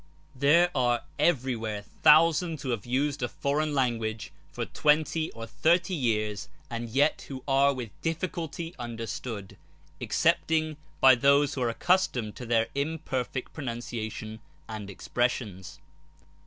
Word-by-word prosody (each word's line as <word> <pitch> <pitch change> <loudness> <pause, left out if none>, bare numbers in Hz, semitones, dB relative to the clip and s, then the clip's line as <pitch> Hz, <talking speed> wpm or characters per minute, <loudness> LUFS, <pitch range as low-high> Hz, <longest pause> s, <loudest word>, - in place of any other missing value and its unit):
There 160 +7 +4
are 120 -3 +1 0.2
everywhere 120 -9 0 0.2
thousands 165 -1 +5
who 130 - -2
have 115 -1 -3
used 140 +3 0
a 120 - +1
foreign 145 +3 -1
language 115 -4 -1 0.2
for - - -3
twenty 155 +1 +1
or 115 0 -7
thirty 170 - +2
years, 110 - -1 0.2
and 115 0 -4
yet 140 +6 +1 0.2
are 140 +1 +4
with 125 -6 -5
difficulty 165 0 -3
understood, 115 -3 -6 0.4
excepting 155 -1 +1 0.2
by 130 0 +8
those 140 +3 +4
who 130 - -4
are 120 - +2
accustomed 125 - +1
to 125 - -7
their 115 -1 +2
imperfect 140 -4 -3
pronunciation 115 -4 -5 0.3
and 110 -2 -6
expressions. 105 -2 -2
130 Hz, 120 wpm, -28 LUFS, 115-155 Hz, 0.4 s, by